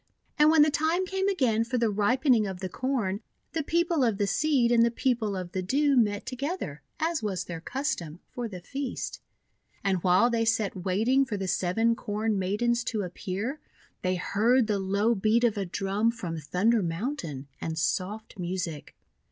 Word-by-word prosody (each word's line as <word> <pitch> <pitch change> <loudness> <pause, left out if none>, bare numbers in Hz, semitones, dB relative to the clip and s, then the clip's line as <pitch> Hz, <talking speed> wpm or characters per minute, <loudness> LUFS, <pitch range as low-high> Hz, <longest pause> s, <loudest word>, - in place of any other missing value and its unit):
And 300 +1 +7
when 315 -1 +7
the 305 - +3
time 320 +5 +1
came 385 +1 -1
again 255 - +2
for 235 +2 -2
the 230 -2 +2
ripen 250 +7 +3
ing 215 -3 +2
of 190 -2 -5
the 185 -1 -4
Corn, 230 -4 -1 0.3
the 325 - -1
People 335 0 +1
of 225 -5 +2
the 205 - +1
Seed 260 +1 +2
and 235 -1 +5
the 235 - +4
People 235 -4 0
of 180 -2 -5
the 185 - -2
Dew 280 +9 +2
met 205 -4 +2
together, 265 - -4 0.2
as 325 0 0
was 200 -4 -2
their 165 -2 -7
custom, 175 - -3
for 245 -2 -4
the 185 -5 -8
feast. 270 +6 -5 0.6
And 190 -3 +1
while 185 +7 +4
they 230 -1 +1
sat 225 -2 +1
wait 190 +4 -1
ing 265 +2 +5
for 220 -6 -3
the 190 -1 -3
Seven 225 +6 +1
Corn 210 -1 -1
Maidens 235 +6 +1
to 220 -3 -1
appear, 195 - -4 0.4
they 185 0 0
heard 225 +7 +2
the 210 -2 0
low 200 +4 +2
beat 220 +3 +2
of 230 -3 +3
a 200 -2 -2
drum 195 +5 0
from 180 -8 -4
Thunder 205 - +2
Mountain, 165 - -3
and 160 0 -3
soft 195 +6 -2
music. 175 -4 -4
220 Hz, 185 wpm, -28 LUFS, 190-255 Hz, 0.6 s, And